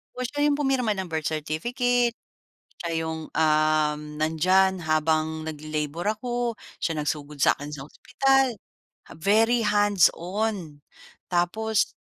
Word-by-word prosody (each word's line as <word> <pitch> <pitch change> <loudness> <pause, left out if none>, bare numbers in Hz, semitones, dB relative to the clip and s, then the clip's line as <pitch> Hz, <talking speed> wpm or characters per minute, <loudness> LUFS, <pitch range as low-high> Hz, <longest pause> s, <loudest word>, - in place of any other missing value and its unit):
Oo, 255 - -3
siya 290 +4 0
'yong 290 - +3
pumirma 265 -6 +1
ng 190 -2 -4
birth 155 -1 -1
certificate. 235 - 0 0.7
Siya 170 -1 -3
'yong 160 0 -4
um 155 -1 +2 0.2
nandiyan 185 +4 +3
habang 155 0 +1
nagle-labor 155 +2 -4
ako. 240 0 -2 0.2
Siya 160 -2 -1
nagsugod 150 -1 -4
sa - - +6
akin 145 +1 -7
sa 135 - -6
ospital. 270 +2 +1 0.6
Very 225 +6 +3
hands-on. 200 -4 +1 0.5
Tapos 205 +5 0
175 Hz, 115 wpm, -25 LUFS, 155-225 Hz, 0.7 s, sa